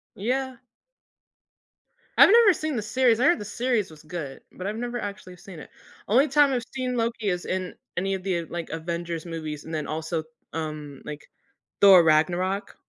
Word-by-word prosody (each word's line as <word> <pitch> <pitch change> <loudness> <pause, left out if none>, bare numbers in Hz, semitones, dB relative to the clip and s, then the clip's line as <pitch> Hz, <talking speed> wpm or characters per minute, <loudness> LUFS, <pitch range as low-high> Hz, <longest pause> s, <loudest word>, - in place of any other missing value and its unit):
Yeah. 255 +4 -2 1.6
I've - - +10
never 460 -3 +7
seen 310 -3 -3
the 220 - -1
series. 235 +1 +2
I 255 - +3
heard - - +5
the 205 - -6
series 235 -4 -1
was 155 - -14
good, 155 -4 -7
but 185 - -8
I've 210 +2 -2
never 240 +1 -4
actually 200 -3 -7
seen 180 -2 -11
it. - - -11 0.4
Only 265 +8 +4
time 290 0 +4
I've 245 -2 -1
seen 255 -2 -2
Loki 230 -2 -1
is 180 -1 -2
in 185 -1 -3 0.2
any 195 +2 -1
of 185 - -7
the, 175 -4 -1
like, 170 -1 -6
Avengers 170 +1 -4
movies. 155 -3 -5
And 160 - -9
then 155 -1 -2
also, 160 +1 -3 0.3
um, 150 -3 -5
like, 150 -1 -8 0.5
Thor: 190 -3 +8
Ragnarok. 180 +5 +1
185 Hz, 175 wpm, -25 LUFS, 165-240 Hz, 1.6 s, I've